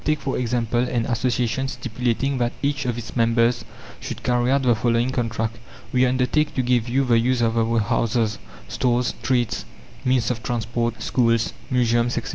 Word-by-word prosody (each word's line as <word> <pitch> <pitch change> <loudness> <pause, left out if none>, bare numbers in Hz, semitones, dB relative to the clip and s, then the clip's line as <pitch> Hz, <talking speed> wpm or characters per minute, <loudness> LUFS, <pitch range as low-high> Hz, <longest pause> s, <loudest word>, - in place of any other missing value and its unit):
Take, 155 0 +1
for 135 -1 -2
example, 120 -1 0
an 120 -2 0
association 125 +1 0
stipulating 125 +2 -2
that 120 0 0
each 140 0 0
of 120 -1 -1
its 115 -2 -7
members 115 0 +2 0.4
should - - -7
carry 125 0 +1
out 135 0 +2
the 125 -2 +4
following 120 +2 +1
contract: 115 -2 -2 0.3
"We 130 0 +4
undertake 130 +4 +1
to 130 - +1
give 120 -1 +1
you 135 +3 +2
the 120 -2 +4
use 125 +2 +1
of 115 -1 +1
our 115 0 +1
houses, 110 0 0 0.3
stores, 125 -1 +1
streets, 120 -3 -1 0.4
means 125 -2 +2
of 120 -2 -4
transport, 115 -2 -2
schools, 115 -2 +1 0.2
museums, 120 -2 +2
etc. 120 - -3
120 Hz, 170 wpm, -23 LUFS, 115-125 Hz, 0.4 s, the